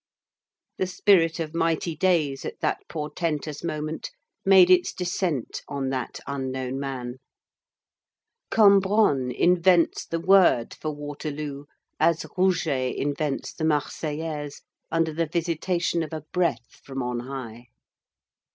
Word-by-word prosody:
The 185 - +1
spirit 180 -3 +3
of 160 -1 -4
mighty 165 0 0
days 155 -5 +1
at - - -6
that - - 0
portentous 150 -1 -3
moment 155 -1 -4 0.3
made 190 -2 +7
its 180 -1 +4
descent 180 - -2
on 140 -2 -3
that 130 -2 -4
unknown 130 -1 -3
man. 130 -2 -5 1.3
Cambronne 200 - +4
invents 175 +4 +3
the 165 - -2
word 180 -9 +4
for 155 - -5
Waterloo 145 -1 -5 0.3
as 165 0 +2
Rouget 170 -9 +1
invents 145 0 -2
the 160 - -6
"Marseillaise," 150 -1 -2 0.3
under 165 -1 +1
the 165 +1 -1
visitation 170 +1 -1
of 160 -1 -5
a 155 - -4
breath 165 -10 -1
from 135 -1 -5
on 125 -1 -2
high. 120 -2 -7
155 Hz, 115 wpm, -25 LUFS, 140-170 Hz, 1.3 s, made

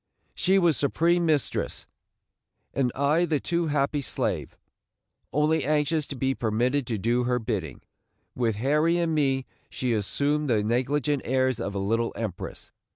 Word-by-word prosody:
She 190 +2 +2
was 170 -5 +3
supreme 170 +4 +2
mistress, 150 -4 -1 0.9
and 130 -3 +1
I 145 +5 +2
the 155 -3 0
too 170 +2 -1
happy 145 0 0
slave, - - -2 0.7
only 150 +1 +2
anxious 150 +1 +1
to 140 - -6
be 135 +1 0
permitted 125 +4 0
to 115 - -1
do 120 +4 +1
her 125 0 +1
bidding. 105 - -4 0.5
With 115 -3 0
Harry 150 +9 +2
and 170 -2 0
me 135 -3 +1 0.2
she 125 -2 -1
assumed 140 +8 0
the 110 -3 +2
negligent 130 +5 0
airs 130 -1 +1
of 100 - -4
a - - -1
little 115 +4 0
empress. 105 -6 -6
135 Hz, 150 wpm, -26 LUFS, 120-150 Hz, 0.9 s, was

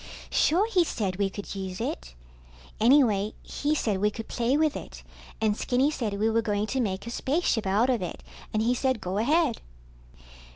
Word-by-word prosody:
Sure 355 +7 +3
he 365 -4 +4
said 195 - -2
we 200 -1 +1
could 200 +1 -7
use 190 -2 -5
it. - - -4 0.6
Anyway 220 -4 +4
he 295 +1 -1
said 210 -9 0
we 210 +2 +3
could 220 +2 -7
play 245 +3 +1
with 310 -1 +2
it, - - -8 0.4
and 215 -2 +2
Skinny 260 +6 +1
said 230 -9 -2
we 215 +2 +1
were 225 +1 +2
going 210 -2 -1
to 260 +4 -1
make 195 -3 -2
a 235 - -5
spaceship 260 - 0
out 205 +6 +3
of 240 -5 0
it, 180 - -5 0.3
and 215 0 0
he 240 +2 +2
said 260 -1 0
go 190 +1 -2
ahead. 290 +2 +2
225 Hz, 190 wpm, -27 LUFS, 200-265 Hz, 0.6 s, he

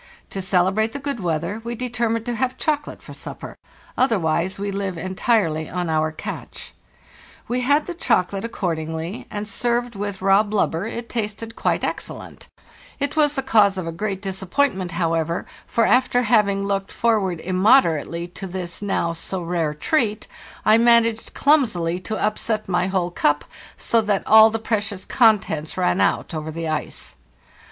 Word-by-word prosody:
To 195 - -3
celebrate 190 +4 +1
the - - -3
good 280 -3 -3
weather 170 +4 -2
we 235 0 -4
determined 235 -2 -1
to 240 - -2
have 255 +2 -1
chocolate 300 -1 -2
for - - -10
supper; - - -8 0.4
otherwise 190 -7 +1
we 200 0 -3
live 195 -2 -3
entirely 185 -3 0
on 175 -2 -2
our 155 0 +1
catch. 155 - -7 0.7
We 250 +1 -1
had 285 +4 +2
the 355 - -5
chocolate 200 - 0
ac 230 - -3
cordingly, 160 -1 -3
and 210 0 -5
served 240 +3 0
with 200 -1 -4
raw 195 +1 +5
blubber 205 -3 -1
it 235 +1 -5
tasted 225 0 -4
quite - - 0
310 - - 0
PARISHES - - -8
L - - -7
IVORTE, - - -12
excellent. 285 0 -8
It - - -10
was 295 -1 +3
the 270 - -1
cause 205 -6 +4
of 185 - -3
a 165 - -3
great 195 +3 -4
disappointment, 190 0 -1
however, 165 -1 -1 0.2
for 230 - +2
after 250 -1 +3
having 210 -3 +3
looked 195 -1 -2
forward 205 -7 +1
immoderately 175 - +2
to 190 +2 -7
this, 180 -1 -5
now 195 -4 0
so 180 +2 -5
rare, 165 -3 -1
treat, 215 - 0 0.4
1 220 +2 +5
managed 230 -1 +3
clumsily 185 - +2
to 215 +4 -4
upset 215 +1 -1
my 180 0 +1
whole 185 -2 -1
cup, 145 -3 +1 0.3
so 230 - +2
that 210 -2 0
all 220 0 +8
the 225 - -2
precious 210 -3 -2
contents 205 - +2
ran 90 +2 +2
out 95 - +1
over 155 0 -4
the 165 +1 -4
ice. 155 0 -4
200 Hz, 170 wpm, -22 LUFS, 175-230 Hz, 0.7 s, all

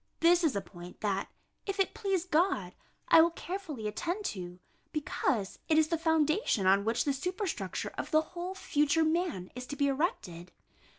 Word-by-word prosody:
This 345 +1 +5
is 310 -9 +2
a 200 - 0
point 175 -2 -12
that, 200 -2 -1 0.4
if 395 0 -3
it 390 - +2
please 390 -4 -1
God, 325 - +1 0.4
I 325 - +9
will 335 - +5
carefully 335 - -5
attend 350 - -3
to, 180 -2 -7 0.3
because 265 -8 -1
it 310 - +4
is 315 -1 +4
the 335 - +2
foundation 320 - +2
on 195 +2 +4
which 230 +2 +1
the 285 - +2
superstructure 360 +7 -3
of - - -4
the 310 -2 +4
whole 360 +2 -4
future 300 -3 +2
man 315 - -1
is 250 +1 -7
to 290 - -5
be 285 - +1
erected. 185 - -2
310 Hz, 175 wpm, -31 LUFS, 210-350 Hz, 0.4 s, I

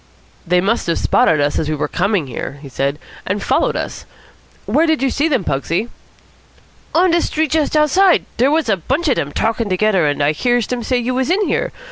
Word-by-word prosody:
"They 180 +1 +3
must 215 +3 0
have 170 - 0
spotted 155 - +2
us 145 0 0
as 155 - -2
we 155 - 0
were 150 - -2
coming 195 -3 0
here," 135 +2 -6
he 140 - -9
said, 140 +2 -2 0.3
"and 200 +2 -3
followed - - +1
us. - - -5 0.6
Where 325 +2 +2
did 315 -3 +1
you 270 - +1
see 295 +3 +1
them, 270 -7 0
Pugsy?" 165 - -2 1.1
"On 355 +2 +4
de 340 0 +3
Street 315 -2 -1
just 310 -1 +1
outside. 360 +5 +3
Dere 255 +4 +3
was 315 -1 +1
a 205 -3 +2
bunch 270 - -2
of 260 - +1
dem 145 - -2
talkin' 225 +2 -1
togedder, 185 -3 +2
and 145 0 -1
I 145 - +3
hears 240 +8 0
dem 250 -1 -3
say 250 +2 0
you 245 +1 -1
was 260 +3 -1
in 395 +3 +1
here. - - -1
230 Hz, 215 wpm, -17 LUFS, -, 1.1 s, On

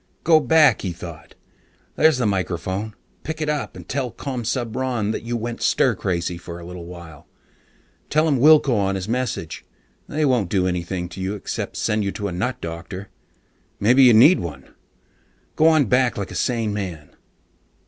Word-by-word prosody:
Go 160 -1 +6
back, 155 +2 +4
he 90 -3 -3
thought. 85 -2 -10 0.6
_There's 160 -4 +4
the 125 - 0
microphone. 95 +2 -2 0.3
Pick 160 +1 -5
it 155 -1 -1
up 150 -2 -3
and - - -11
tell 130 -2 -2
Commsubron 120 -2 -2
that - - -3
you 120 +1 -3
went 115 +1 -5
stir - - +3
crazy 85 -1 -2
for 85 -1 -8
a 85 - -10
little 90 -1 -8
while. 85 -4 -11 0.8
Tell 155 +2 +2
him 140 -5 +2
wilco 150 -1 +6
on 100 -2 0
his 95 0 -4
message. 115 -9 -3 0.4
They 155 +1 0
won't 125 -9 +1
do 95 -2 +1
anything 90 0 -2
to 95 +1 -8
you 95 +2 -2
except 100 - -5
send 105 0 0
you 100 - -1
to 100 - -4
a - - -4
nut 125 +8 -2
doctor. 85 +4 -7 0.7
Maybe 125 +6 +4
you 125 -3 +8
need 140 +11 +7
one. 70 -6 -8 0.8
Go 155 - +4
on 155 -3 +5
back 125 +1 +2
like 100 -2 -4
a - - -7
sane 115 -4 0
man. 90 -7 -5
105 Hz, 175 wpm, -22 LUFS, 90-130 Hz, 0.8 s, you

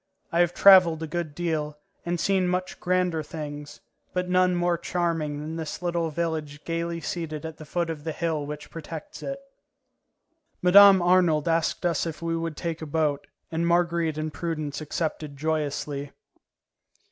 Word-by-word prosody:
I 170 - +1
have 175 0 +3
travelled 180 -5 +7
a - - -3
good 155 -2 -4
deal, 155 -3 -2 0.3
and 175 0 -1
seen 190 0 +2
much 180 +1 -2
grander 180 -3 +1
things, 150 -1 -7 0.3
but 180 0 -1
none 180 0 +3
more 175 0 +2
charming 165 -4 -2
than 155 +2 -5
this 160 +2 -5
little 170 -2 0
village 155 -2 -3
gaily 170 0 -2
seated 160 -2 -4
at 160 -1 -7
the 155 - -10
foot 170 +2 -1
of 150 -2 -7
the 160 - -2
hill 160 -2 -2
which 150 +1 -7
protects 165 -1 -8
it. 275 0 -4 1.2
Mme. 195 0 +8
Arnould 175 -4 +3
asked 165 +1 0
us 170 -1 +1
if 160 - -5
we 165 -1 -2
would 165 -2 -3
take 165 -1 -4
a 160 - -5
boat, 150 -2 0 0.2
and 165 +1 0
Marguerite 170 -2 +1
and 155 -1 -3
Prudence 155 -3 -3
accepted 155 -1 -3
joyously. 145 -2 -2
165 Hz, 160 wpm, -26 LUFS, 155-175 Hz, 1.2 s, Mme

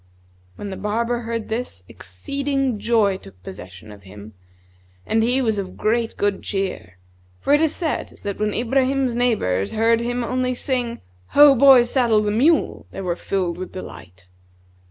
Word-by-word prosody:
When 205 - -7
the 190 - -6
barber 230 +3 -1
heard 230 -1 -4
this, 220 - -4
exceeding 270 - -3
joy 210 -4 +2
took 90 - -16
possession 95 +2 -10
of 105 -1 -13
him. 100 +2 -12 0.7
and 225 - +1
he 250 +4 +2
was 220 -3 0
of 185 -2 -6
great 230 +1 0
good 205 -1 0
cheer; 190 - -4 0.4
for - - +1
it 295 - +4
is 320 -1 +1
said 325 -4 -3
that 200 -1 -4
when 210 0 0
Ibrahim's 260 +2 0
neighbours 205 - 0
heard 225 +1 +3
him 245 +1 -2
only 255 +1 -1
sing 245 -2 -1
out, - - -9 0.4
'Ho, 290 -1 +9
boy, 265 -1 +7
saddle 240 -3 +2
the 210 - 0
mule!' 285 +10 +2
they - - -7
were 180 -2 -2
filled 180 -2 -2
with 185 - -7
delight. 90 - -10
225 Hz, 165 wpm, -21 LUFS, 185-250 Hz, 0.7 s, Ho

